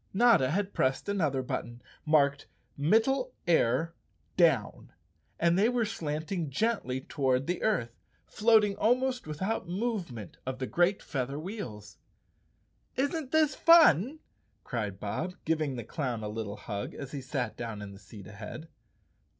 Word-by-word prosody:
Notta 230 - +5
had 195 +5 -1
pressed 130 +6 0
another 155 -10 0
button 120 -1 -4 0.3
marked 145 -2 +3 0.3
"Middle 225 - +2
Air—Down," 160 - +1 0.5
and 170 +2 +3
they 215 +4 +4
were 245 -2 +1
slanting 160 -3 -3
gently 140 - -1
toward 130 -2 0
the 180 +3 -2
earth, 120 - 0 0.3
floating 215 -2 +3
almost 250 0 +1
without 185 +6 -3
movement 180 - -3
of 130 0 -4
the 130 - -3
great 175 +7 +1
feather 135 -1 -3
wheels. 125 - -7 1.0
"Isn't 285 +1 -1
this 310 -3 +3
fun?" 305 - +6 0.5
cried 105 -6 -4
Bob, 160 - -3
giving 155 -4 0
the 120 - -5
clown 120 -2 -3
a 105 - -3
lit¬ 110 +1 -3
tle 100 0 -6
hug 100 -2 -5
as 140 -1 -7
he 140 - -5
sat 130 -3 -3
down 115 -3 -5
in 105 -1 -7
the 100 - -13
seat 105 -2 -12
ahead. 110 +10 -9
155 Hz, 140 wpm, -30 LUFS, 125-210 Hz, 1.0 s, fun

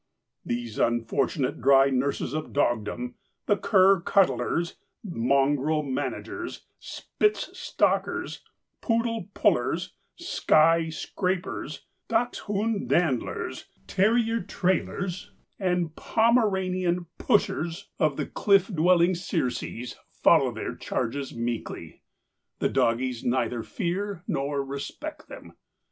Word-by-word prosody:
These 120 -2 -4
unfortunate 120 +4 0
dry 135 0 +5
nurses 135 0 -1
of 155 0 -4
dogdom, 120 -2 0 0.3
the 205 - +3
cur 190 -1 +4
cuddlers, 170 -1 +1 0.3
mongrel 145 - +1
managers, 145 - -4
Spitz 425 0 -1
stalkers, - - 0 0.4
poodle 230 -4 -1
pullers, - - +1 0.2
Skye 165 - +3
scrapers, 175 -4 -3 0.2
dachshund 225 -2 -1
dandlers, 160 -9 0 0.2
terrier 225 +3 +2
trailers 185 0 -2 0.3
and 180 -4 0
Pomeranian 190 -6 +1
pushers 190 -5 0
of 155 -5 +2
the 150 - -1
cliff 195 -1 +3
dwelling 175 0 +4
Circes 125 -8 -3
follow - - +4
their - - -4
charges 130 +3 -3
meekly. 115 0 -4 0.6
The - - +1
doggies 120 +1 0
neither 120 -1 0
fear 190 - -3
nor 140 0 -1
respect 140 - -7
them. - - -11
170 Hz, 95 wpm, -26 LUFS, 135-195 Hz, 0.6 s, dry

